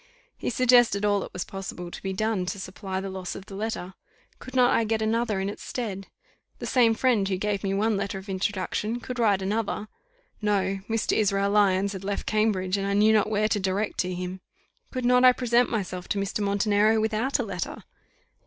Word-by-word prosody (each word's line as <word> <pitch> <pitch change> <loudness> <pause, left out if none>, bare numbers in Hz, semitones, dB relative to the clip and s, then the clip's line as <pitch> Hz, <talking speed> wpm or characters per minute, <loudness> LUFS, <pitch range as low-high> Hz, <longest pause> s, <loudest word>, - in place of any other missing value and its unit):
He - - -3
suggested 240 -4 +4
all 205 -1 +3
that - - -6
was 180 - -3
possible 190 -2 -7
to - - -8
be 195 - -3
done 195 -1 -1
to 190 +2 -3
supply 190 0 -5
the 195 0 -4
loss 190 -1 -5
of 195 - -9
the 200 - -11
letter. 195 -2 -4 0.5
Could 255 - -10
not 250 -1 +5
I 230 - +3
get 220 0 0
another 220 -1 0
in 190 - -1
its 205 - -6
stead? 200 -6 -4 0.5
The - - -6
same 235 -3 +4
friend 230 -6 +2
who 190 - 0
gave 205 +1 -2
me 195 -1 0
one 215 +1 +1
letter 200 0 -3
of 190 +1 -10
introduction 200 +4 -2
could 250 0 -6
write 205 -4 +3
another. 210 +1 -2 0.5
No; 195 -2 +1
Mr. 225 -1 0
Israel 200 -1 +2
Lyons 200 -1 +3
had 190 -1 -7
left 200 +1 -3
Cambridge, 205 -3 +1
and 195 0 -2
I 200 - 0
knew 210 +2 +5
not 215 -1 +3
where 215 0 +2
to 210 - +1
direct 195 +2 -1
to 185 - 0
him. 180 +1 -5 0.5
Could 255 -1 -3
not 250 +1 +5
I 255 0 +8
present 245 -1 +2
myself 185 -5 -3
to - - 0
Mr. 195 +1 -2
Montenero 205 +2 +3
without 220 +5 0
a - - -1
letter? - - -5
205 Hz, 210 wpm, -26 LUFS, 195-220 Hz, 0.5 s, I